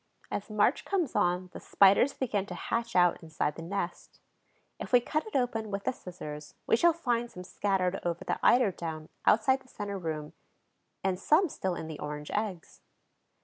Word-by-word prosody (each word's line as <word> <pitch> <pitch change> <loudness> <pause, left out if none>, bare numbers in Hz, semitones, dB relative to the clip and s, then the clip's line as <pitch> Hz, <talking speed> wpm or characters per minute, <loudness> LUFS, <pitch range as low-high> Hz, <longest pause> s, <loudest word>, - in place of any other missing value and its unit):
As 205 - -3
March 215 +5 +2
comes 360 -9 -1
on 180 -2 +1
the - - -7
Spiders 200 +7 +5
begin 210 -8 -2
to - - -6
hatch 230 0 -2
out 175 -1 +4
inside 155 -2 -2
the - - -7
nest. 175 0 -5 0.6
If - - -6
we 245 - +7
cut 305 - -2
it 435 - -9
open 235 -4 0
with 200 0 -3
the - - +1
scissors 150 -9 -9
we - - +4
shall 340 +9 +5
find 240 -8 -1
some 180 - -9
scattered 190 0 0
over 175 -1 -2
the - - -1
eider 245 -5 +5
down 160 -3 -6 0.2
outside 260 +5 +5
the - - -21
center 200 -5 -5
room, 155 -3 -4 0.7
and 190 -1 0
some 315 - +4
still 190 -8 -2
in 160 - -5
the 160 -2 -7
orange 150 0 -5
eggs. 205 -5 -3
200 Hz, 185 wpm, -30 LUFS, 175-240 Hz, 0.7 s, we